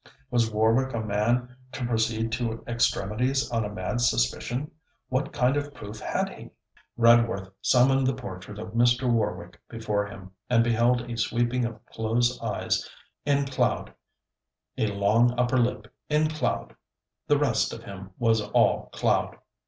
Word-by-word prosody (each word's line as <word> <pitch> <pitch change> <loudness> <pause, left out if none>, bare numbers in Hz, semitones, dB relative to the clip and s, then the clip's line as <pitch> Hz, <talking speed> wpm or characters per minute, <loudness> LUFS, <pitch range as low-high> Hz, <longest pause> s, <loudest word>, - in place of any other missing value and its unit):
Was 120 -2 +2
Warwick 115 +4 +2
a - - -1
man 120 +4 0 0.2
to 125 - -3
proceed 115 -1 0
to 115 -1 -2
extremities 120 +3 0
on 115 -1 0
a 105 - -3
mad 105 +4 -3
suspicion? 120 - 0 0.4
What 130 +2 -1
kind 125 +2 +2
of 145 0 -3
proof 105 +1 -8
had - - -1
he? - - -11 0.5
Redworth 115 -5 +4
summoned 135 +1 +4
the 130 - +1
portrait 100 -4 -8
of 105 - -6
Mr. 120 +2 +3
Warwick 105 -7 -1
before 105 -3 -2
him, 95 -2 -11 0.2
and 115 -2 +4
beheld 120 +1 +2
a 120 -1 -6
sweeping 120 +3 0
of 115 -2 -7
close 120 +2 0
eyes 110 -3 -1 0.4
in 140 -1 +2
cloud, 135 -1 -1 0.8
a 110 - 0
long 105 +4 +2
upper 125 +1 +2
lip 115 -3 -1 0.2
in 155 +1 +2
cloud; 155 0 -2 0.5
the 145 - +4
rest 135 -6 +1
of 115 - -8
him 95 -3 -9
was 115 -2 +2
all - - +2
cloud. - - 0
115 Hz, 150 wpm, -26 LUFS, 110-125 Hz, 0.8 s, Redworth